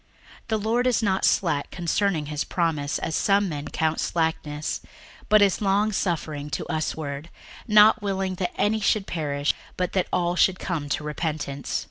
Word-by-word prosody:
61:003:009 -, -, -33 dB
The 220 Hz, -1 st, +1 dB
Lord 230 Hz, +4 st, +1 dB
is 240 Hz, -2 st, +2 dB
not 190 Hz, -2 st, +2 dB
slack 155 Hz, -6 st, +1 dB
concerning 175 Hz, -2 st, 0 dB
his 150 Hz, 0 st, -2 dB
promise, 155 Hz, -5 st, -1 dB
as 160 Hz, -, -3 dB
some 200 Hz, 0 st, +3 dB
men 145 Hz, -4 st, -5 dB
count 160 Hz, 0 st, -1 dB
slackness; 155 Hz, -2 st, -1 dB, 0.5 s
but 215 Hz, -1 st, +7 dB
is 200 Hz, 0 st, +2 dB
longsuffering 190 Hz, -7 st, 0 dB
to -, -, -3 dB
us 155 Hz, 0 st, -2 dB
ward, 145 Hz, 0 st, -5 dB, 0.4 s
not 215 Hz, 0 st, +6 dB
willing 195 Hz, -2 st, -1 dB
that 180 Hz, -, -3 dB
any 220 Hz, +1 st, +2 dB
should 210 Hz, -1 st, +1 dB
perish, 145 Hz, -4 st, -1 dB, 0.2 s
but 180 Hz, -1 st, -1 dB
that 185 Hz, -2 st, +1 dB
all 175 Hz, -1 st, +1 dB
should 185 Hz, +1 st, +3 dB
come 160 Hz, -7 st, -3 dB
to 150 Hz, -, -1 dB
repentance. 150 Hz, -2 st, -3 dB
175 Hz, 165 wpm, -25 LUFS, 150-200 Hz, 0.5 s, but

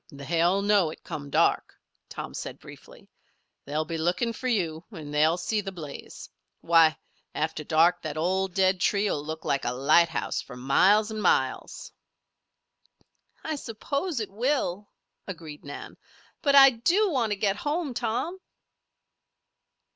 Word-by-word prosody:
"They'll 170 Hz, +7 st, 0 dB
know 200 Hz, -5 st, +3 dB
it, 155 Hz, -, -11 dB
come 145 Hz, -1 st, -7 dB
dark," -, -, +1 dB, 0.3 s
Tom -, -, -7 dB
said -, -, -6 dB
briefly. -, -, -15 dB, 0.6 s
"They'll 150 Hz, +2 st, -2 dB
be 165 Hz, +1 st, -4 dB
looking 180 Hz, +8 st, 0 dB
for 255 Hz, -, -5 dB
you 170 Hz, -9 st, -1 dB
and 155 Hz, -8 st, -9 dB
they'll 155 Hz, +3 st, +3 dB
see 210 Hz, +4 st, -1 dB
the 195 Hz, -1 st, -6 dB
blaze. 155 Hz, -6 st, -9 dB, 0.3 s
Why! 165 Hz, -3 st, +4 dB, 0.4 s
After 155 Hz, 0 st, -2 dB
dark 165 Hz, +3 st, +3 dB
that 155 Hz, -1 st, -5 dB
old 185 Hz, +3 st, -1 dB
dead 190 Hz, -1 st, +3 dB
tree 205 Hz, 0 st, +2 dB
will 145 Hz, -, -2 dB
look 160 Hz, +1 st, -6 dB
like 140 Hz, -, 0 dB
a 120 Hz, -, -1 dB
lighthouse 160 Hz, +5 st, +2 dB
for 125 Hz, -, -11 dB
miles 200 Hz, -, +3 dB
'n' 215 Hz, -1 st, -4 dB
miles!" -, -, 0 dB, 1.5 s
"I 315 Hz, -, -2 dB
suppose 280 Hz, -, -3 dB
it 215 Hz, -3 st, -4 dB
will," 210 Hz, -4 st, -1 dB, 0.4 s
agreed 165 Hz, -6 st, -8 dB
Nan. 145 Hz, 0 st, -9 dB, 0.4 s
"But 280 Hz, -1 st, +3 dB
I 270 Hz, -1 st, +9 dB
do 350 Hz, -, +2 dB
want 240 Hz, -7 st, 0 dB
to -, -, -2 dB
get 200 Hz, 0 st, 0 dB
home, 295 Hz, +2 st, -2 dB
Tom." 320 Hz, +12 st, -2 dB
185 Hz, 145 wpm, -26 LUFS, 155-225 Hz, 1.5 s, I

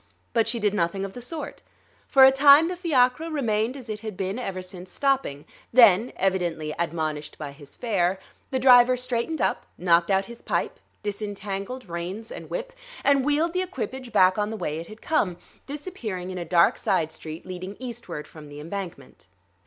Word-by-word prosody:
But 225 Hz, -2 st, +3 dB
she 235 Hz, +1 st, 0 dB
did 210 Hz, -2 st, +1 dB
nothing 190 Hz, +1 st, 0 dB
of 195 Hz, -, -8 dB
the 245 Hz, -, -8 dB
sort. 305 Hz, +6 st, -6 dB, 0.5 s
For 265 Hz, -2 st, +7 dB
a 265 Hz, -, +8 dB
time 285 Hz, +4 st, +7 dB
the 365 Hz, -, -3 dB
fiacre 310 Hz, -3 st, +2 dB
remained 240 Hz, -4 st, 0 dB
as 255 Hz, -3 st, -10 dB
it 215 Hz, -1 st, -4 dB
had 215 Hz, -3 st, -7 dB
been 195 Hz, +4 st, -2 dB
ever 190 Hz, -6 st, -4 dB
since 185 Hz, 0 st, -10 dB
stopping; 270 Hz, -, 0 dB, 0.3 s
then, 230 Hz, -2 st, +6 dB
evidently 175 Hz, -5 st, -1 dB
admonished 155 Hz, -3 st, -2 dB
by 150 Hz, -2 st, -6 dB
his 140 Hz, 0 st, -14 dB
fare, 190 Hz, -5 st, 0 dB, 0.3 s
the 265 Hz, -, -1 dB
driver 250 Hz, -1 st, +7 dB
straightened 250 Hz, +5 st, -1 dB
up, -, -, -1 dB
knocked 170 Hz, -1 st, +3 dB
out 195 Hz, 0 st, +2 dB
his 235 Hz, +3 st, -11 dB
pipe, -, -, -2 dB, 0.2 s
disentangled 205 Hz, +3 st, -4 dB
reins 180 Hz, +6 st, -5 dB
and -, -, -8 dB
whip, -, -, -4 dB, 0.3 s
and 280 Hz, -1 st, +4 dB
wheeled 300 Hz, +4 st, +1 dB
the 365 Hz, -, +1 dB
equipage 265 Hz, -9 st, -5 dB
back 185 Hz, -1 st, +4 dB
on 210 Hz, 0 st, 0 dB
the 220 Hz, -, -4 dB
way 155 Hz, -5 st, -3 dB
it 165 Hz, -, -8 dB
had 215 Hz, +1 st, -13 dB
come, 195 Hz, -, +1 dB, 0.3 s
disappearing 245 Hz, -, -5 dB
in 185 Hz, -, -5 dB
a 175 Hz, -, -4 dB
dark 170 Hz, 0 st, +4 dB
side 160 Hz, -1 st, +1 dB
street 160 Hz, +1 st, -8 dB
leading 185 Hz, +2 st, -7 dB
eastward 240 Hz, -11 st, -6 dB
from 150 Hz, -2 st, -12 dB
the 145 Hz, 0 st, -9 dB
embankment. 175 Hz, -, -7 dB
210 Hz, 185 wpm, -25 LUFS, 180-255 Hz, 0.5 s, a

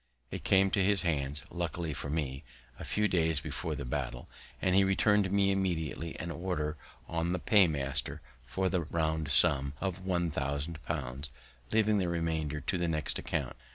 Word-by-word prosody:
It -, -, -5 dB
came 95 Hz, 0 st, +4 dB
to 100 Hz, -, +3 dB
his 100 Hz, 0 st, +3 dB
hands, 75 Hz, -3 st, 0 dB
luckily 85 Hz, -2 st, -2 dB
for 70 Hz, +1 st, -4 dB
me, 70 Hz, -2 st, -2 dB, 0.4 s
a -, -, -6 dB
few 105 Hz, 0 st, +1 dB
days 80 Hz, -5 st, +2 dB
before 75 Hz, +2 st, -4 dB
the 70 Hz, 0 st, -5 dB
battle, -, -, -3 dB, 0.3 s
and 95 Hz, -, +2 dB
he 100 Hz, +1 st, +6 dB
return'd 95 Hz, 0 st, +3 dB
me 100 Hz, 0 st, +4 dB
immediately 85 Hz, -4 st, -2 dB
an 85 Hz, -, -4 dB
order 85 Hz, -4 st, -2 dB, 0.3 s
on 85 Hz, +1 st, -1 dB
the 90 Hz, -, -1 dB
paymaster 75 Hz, -, +2 dB, 0.2 s
for 95 Hz, +10 st, -1 dB
the 90 Hz, -1 st, +1 dB
round 80 Hz, -1 st, -1 dB
sum 70 Hz, 0 st, +3 dB
of 95 Hz, -1 st, -3 dB
one 85 Hz, -3 st, 0 dB
thousand 70 Hz, +3 st, -2 dB
pounds, 70 Hz, +4 st, -3 dB, 0.4 s
leaving 110 Hz, -1 st, +3 dB
the 90 Hz, -2 st, 0 dB
remainder 80 Hz, -3 st, -1 dB
to 90 Hz, +7 st, -1 dB
the 85 Hz, -, +1 dB
next 80 Hz, -2 st, -1 dB
account. -, -, -2 dB
85 Hz, 170 wpm, -31 LUFS, 75-95 Hz, 0.4 s, he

